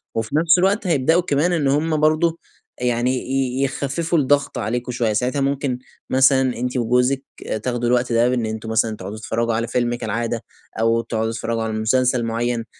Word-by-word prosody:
وفي 115 Hz, +4 st, -2 dB
نفس 165 Hz, +2 st, +5 dB
الوقت 195 Hz, +2 st, +1 dB
هيبدؤوا 160 Hz, +2 st, +3 dB
كمان 160 Hz, +1 st, +1 dB
إن 155 Hz, -5 st, +1 dB
هم 155 Hz, +3 st, +1 dB
برضه 155 Hz, +2 st, +2 dB, 0.4 s
آآ، -, -, -3 dB
يعني 120 Hz, +1 st, +1 dB
ي 130 Hz, 0 st, -1 dB
يخفّفوا 145 Hz, +5 st, -1 dB
الضغط 145 Hz, 0 st, +1 dB
عليكم 120 Hz, +4 st, -2 dB
شوية، 115 Hz, -3 st, 0 dB
ساعتها 125 Hz, +6 st, 0 dB
ممكن 135 Hz, -2 st, -1 dB, 0.3 s
مثلًا 135 Hz, 0 st, +4 dB, 0.2 s
أنتِ 125 Hz, +1 st, -2 dB
وجوزك 125 Hz, +3 st, +1 dB, 0.4 s
تاخدوا 120 Hz, -1 st, -1 dB
الوقت 125 Hz, 0 st, +1 dB
ده 115 Hz, +1 st, +3 dB
بإن 125 Hz, -2 st, 0 dB
أنتم 110 Hz, 0 st, -5 dB
مثلًا 110 Hz, 0 st, +1 dB
تقعدوا 105 Hz, 0 st, -7 dB
تتفرّجوا 115 Hz, +1 st, -1 dB
على 115 Hz, +1 st, -1 dB
فيلم 120 Hz, 0 st, 0 dB
كالعادة 115 Hz, 0 st, -3 dB, 0.4 s
أو 115 Hz, +1 st, +2 dB
تقعدوا 110 Hz, -1 st, -2 dB
تتفرجوا 115 Hz, 0 st, -2 dB
على 110 Hz, 0 st, -3 dB
مسلسل 120 Hz, +3 st, +1 dB
معين، 115 Hz, 0 st, -1 dB
125 Hz, 175 wpm, -21 LUFS, 115-140 Hz, 0.4 s, نفس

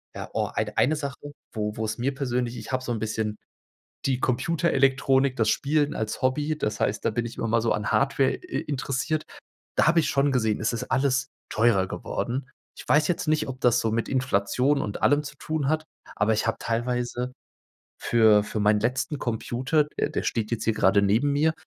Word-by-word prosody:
Ja, -, -, -6 dB
oh, -, -, 0 dB
eid -, -, -2 dB
eine 155 Hz, -, +3 dB
Sache, 145 Hz, -1 st, -6 dB, 0.2 s
wo 105 Hz, -1 st, -2 dB
wo 110 Hz, -, -3 dB
es 110 Hz, 0 st, -2 dB
mir 135 Hz, +3 st, -1 dB
persönlich 125 Hz, -3 st, -1 dB
ich 110 Hz, -, -7 dB
habe 130 Hz, 0 st, 0 dB
so 120 Hz, -2 st, -3 dB
'n 110 Hz, -, -3 dB
bisschen 110 Hz, -1 st, -2 dB, 0.7 s
die 130 Hz, -2 st, 0 dB
Computerelektronik, 135 Hz, -2 st, +2 dB
das 110 Hz, -3 st, +2 dB
Spielen 145 Hz, 0 st, +1 dB
als 110 Hz, 0 st, -3 dB
Hobby. 145 Hz, +4 st, 0 dB
Das 105 Hz, -7 st, -2 dB
heißt, -, -, 0 dB
da -, -, +2 dB
bin 115 Hz, +2 st, -2 dB
ich 115 Hz, -, -7 dB
immer 115 Hz, -, -2 dB
mal 115 Hz, -, +3 dB
so 115 Hz, -, +1 dB
an 105 Hz, -, -2 dB
Hardware 135 Hz, -1 st, +2 dB
i 365 Hz, -1 st, -5 dB
interessiert. 145 Hz, +2 st, -2 dB, 0.5 s
Da -, -, +3 dB
habe 170 Hz, 0 st, +5 dB
ich -, -, +1 dB
schon 140 Hz, 0 st, +2 dB
gesehen, 110 Hz, -4 st, +1 dB
es 110 Hz, -, +1 dB
ist 115 Hz, -, -3 dB
alles 130 Hz, 0 st, +2 dB, 0.2 s
teurer 105 Hz, -4 st, +3 dB
geworden. 125 Hz, +4 st, -4 dB, 0.3 s
Ich -, -, -11 dB
weiß 150 Hz, 0 st, +3 dB
jetzt 175 Hz, -, -1 dB
nicht, 155 Hz, 0 st, +1 dB
ob 130 Hz, -, -6 dB
das 125 Hz, -1 st, +3 dB
so 110 Hz, -, 0 dB
mit 115 Hz, +1 st, -1 dB
Inflation 130 Hz, +2 st, +1 dB
und 100 Hz, -, -5 dB
allem 145 Hz, +1 st, +3 dB
zu 140 Hz, 0 st, -8 dB
tun 155 Hz, -3 st, -2 dB
hat, 155 Hz, +2 st, +1 dB, 0.3 s
aber 105 Hz, +2 st, +2 dB
ich 110 Hz, -, 0 dB
habe 115 Hz, -, +1 dB
teilweise 120 Hz, +1 st, -2 dB, 0.7 s
für 110 Hz, -3 st, +5 dB
für 105 Hz, -, -4 dB
meinen 105 Hz, 0 st, +3 dB
letzten 130 Hz, +6 st, -1 dB
Computer, 130 Hz, +6 st, 0 dB
der 150 Hz, -, -3 dB
der -, -, -2 dB
steht 110 Hz, -2 st, -1 dB
jetzt 115 Hz, -, -2 dB
hier 115 Hz, -, +1 dB
grade 95 Hz, 0 st, +4 dB
neben 110 Hz, +8 st, +2 dB
mir, 155 Hz, +3 st, +3 dB
125 Hz, 205 wpm, -26 LUFS, 110-140 Hz, 0.7 s, habe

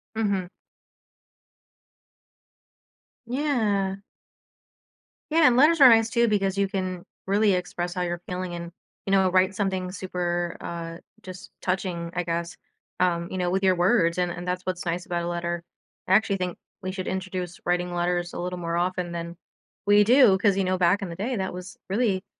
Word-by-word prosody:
Mhm. 200 Hz, -5 st, -1 dB, 2.8 s
Yeah. 220 Hz, -8 st, 0 dB, 1.3 s
Yeah, 320 Hz, -2 st, +6 dB
and 240 Hz, -, +4 dB
letters 305 Hz, +5 st, +5 dB
are 270 Hz, -, +10 dB
nice 225 Hz, -1 st, +6 dB
too 235 Hz, 0 st, +2 dB
because 195 Hz, -2 st, +1 dB
you 200 Hz, 0 st, +2 dB
can 185 Hz, -2 st, -4 dB, 0.2 s
really 200 Hz, +1 st, +3 dB
express 175 Hz, -1 st, -3 dB
how 180 Hz, -, -3 dB
you're 175 Hz, -1 st, -2 dB
feeling 180 Hz, -1 st, -4 dB
and, 170 Hz, 0 st, -6 dB, 0.4 s
you 195 Hz, -, -2 dB
know, 190 Hz, -1 st, +4 dB
write 185 Hz, +1 st, +3 dB
something 190 Hz, -2 st, -1 dB
super, 175 Hz, -2 st, -2 dB
uh, 165 Hz, -1 st, -6 dB, 0.3 s
just 185 Hz, -1 st, -10 dB
touching, 180 Hz, -2 st, -2 dB
I 180 Hz, -, 0 dB
guess, 170 Hz, 0 st, -3 dB, 0.4 s
um, 170 Hz, -1 st, +1 dB
you 185 Hz, -, -3 dB
know, 180 Hz, -1 st, 0 dB
with 190 Hz, +2 st, 0 dB
your 185 Hz, -1 st, +4 dB
words, 175 Hz, -2 st, +3 dB
and 180 Hz, -1 st, +1 dB
and 175 Hz, 0 st, -6 dB
that's 180 Hz, 0 st, -3 dB
what's 185 Hz, -1 st, -3 dB
nice 175 Hz, +1 st, -2 dB
about 175 Hz, -2 st, -2 dB
a -, -, -3 dB
letter. 170 Hz, 0 st, -3 dB, 0.5 s
I -, -, +4 dB
actually 205 Hz, -1 st, +3 dB
think 180 Hz, -2 st, -3 dB, 0.3 s
we 185 Hz, -, -2 dB
should 185 Hz, -1 st, -5 dB
introduce 185 Hz, -2 st, -4 dB
writing 175 Hz, 0 st, 0 dB
letters 175 Hz, 0 st, -1 dB
a -, -, -5 dB
little 180 Hz, +1 st, -4 dB
more 170 Hz, -1 st, -2 dB
often 175 Hz, 0 st, -1 dB
than 170 Hz, 0 st, -6 dB, 0.5 s
we 205 Hz, 0 st, +6 dB
do 235 Hz, -3 st, +6 dB
'cause, 195 Hz, 0 st, +2 dB
you 195 Hz, -, +1 dB
know, 185 Hz, 0 st, +1 dB
back 180 Hz, +2 st, +3 dB
in 195 Hz, -, -3 dB
the 170 Hz, -, -6 dB
day, 230 Hz, +6 st, -2 dB
that 190 Hz, -1 st, -3 dB
was 180 Hz, +2 st, -9 dB
really 195 Hz, -2 st, 0 dB
185 Hz, 175 wpm, -25 LUFS, 175-195 Hz, 2.8 s, are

